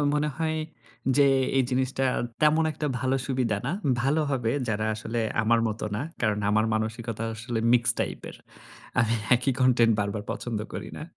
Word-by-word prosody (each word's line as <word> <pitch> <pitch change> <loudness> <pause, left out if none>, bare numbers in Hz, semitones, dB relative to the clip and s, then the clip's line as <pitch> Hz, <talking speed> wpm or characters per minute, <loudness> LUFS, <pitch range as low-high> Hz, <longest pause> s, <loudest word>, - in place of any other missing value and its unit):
মনে 150 0 +1
হয় 160 -1 -1 0.6
যে, 145 - +6 0.3
এই 135 - +5
জিনিসটা 130 +1 0 0.4
তেমন 155 +1 +4
১ - - -9
টা - - +2
ভালো 130 +2 +1
সুবিধা 125 -6 0
না। 135 - 0 0.3
ভালো 140 +5 +2
হবে 120 -5 0 0.2
যারা 110 0 0
আসলে 110 +2 -4 0.2
আমার 115 +1 +3
মত 110 +1 -5 0.2
না। - - -2 0.2
কারণ 110 -3 +1
আমার 110 +1 +3
মানসিকতা 110 +1 -3
আসলে 115 +1 -4
মিক্সড 120 0 +3
টাইপের। - - -4 0.6
আমি 115 -1 +2 0.2
একই 125 +2 +1
কনটেন্ট 120 -3 +5
বারবার 105 +1 -2
পছন্দ 115 -3 -3
করি - - -5
না। - - -6
120 Hz, 165 wpm, -26 LUFS, 110-135 Hz, 0.6 s, যে